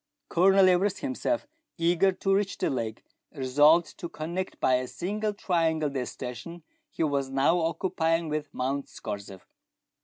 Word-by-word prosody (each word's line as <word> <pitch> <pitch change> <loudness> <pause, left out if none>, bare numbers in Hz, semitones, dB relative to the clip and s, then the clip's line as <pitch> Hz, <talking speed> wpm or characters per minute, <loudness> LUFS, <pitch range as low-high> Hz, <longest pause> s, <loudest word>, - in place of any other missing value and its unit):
Colonel 190 +2 +5
Everest, 185 +2 +2
himself 290 +2 -1 0.3
eager 175 +3 +3
to 195 +1 0
reach 200 0 0
the - - 0
lake, 115 -4 -3 0.3
resolved 145 +5 +3
to 170 - -5
connect 170 +5 -5
by 130 - +3
a 130 0 -3
single 210 - -2
triangle 165 -6 0
the 130 -3 -3
station 130 +7 -7 0.3
he - - -2
was 140 -3 0
now 140 +6 +2
occupying 165 -1 0
with 150 -1 -3
Mount 135 +2 -2
Scorzef. 100 -3 -7
165 Hz, 145 wpm, -27 LUFS, 135-185 Hz, 0.3 s, Colonel